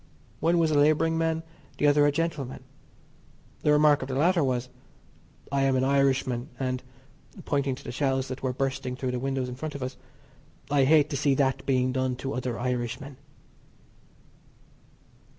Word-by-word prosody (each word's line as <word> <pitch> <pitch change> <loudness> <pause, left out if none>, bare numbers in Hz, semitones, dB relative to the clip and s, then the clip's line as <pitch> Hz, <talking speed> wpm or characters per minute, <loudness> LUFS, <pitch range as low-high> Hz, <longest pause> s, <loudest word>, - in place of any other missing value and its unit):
One 170 +2 +2
was 165 -2 +2
a 145 - +3
labouring 155 +2 +3
man, 165 0 0 0.3
the - - +1
other 145 0 +5
a - - +3
gentleman. 145 -4 -3 1.0
The 150 - +3
remark 150 0 +5
of 130 - -4
the 130 - -3
latter 170 +4 +3
was: 125 -2 -1 0.8
"I 140 0 +1
am 135 -1 +2
an 130 - +2
Irishman, 135 -2 +1
and 130 -1 -2 0.6
(pointing 140 -2 0
to - - -13
the - - -6
shells 135 0 0
that 130 - -6
were 130 - 0
bursting 130 -1 -2
through 130 0 -3
the 125 - -2
windows 135 0 -2
in 125 - -5
front 150 +4 -6
of 140 - -4
us) 130 0 -5 0.7
I 140 -2 +4
hate 150 +1 +4
to 140 - -1
see 140 0 +2
that 135 -1 0
being 130 -1 +2
done 130 0 -1
to 135 +2 -5
other 125 -2 -3
Irishmen." 125 +2 -3
135 Hz, 170 wpm, -27 LUFS, 130-145 Hz, 1.0 s, other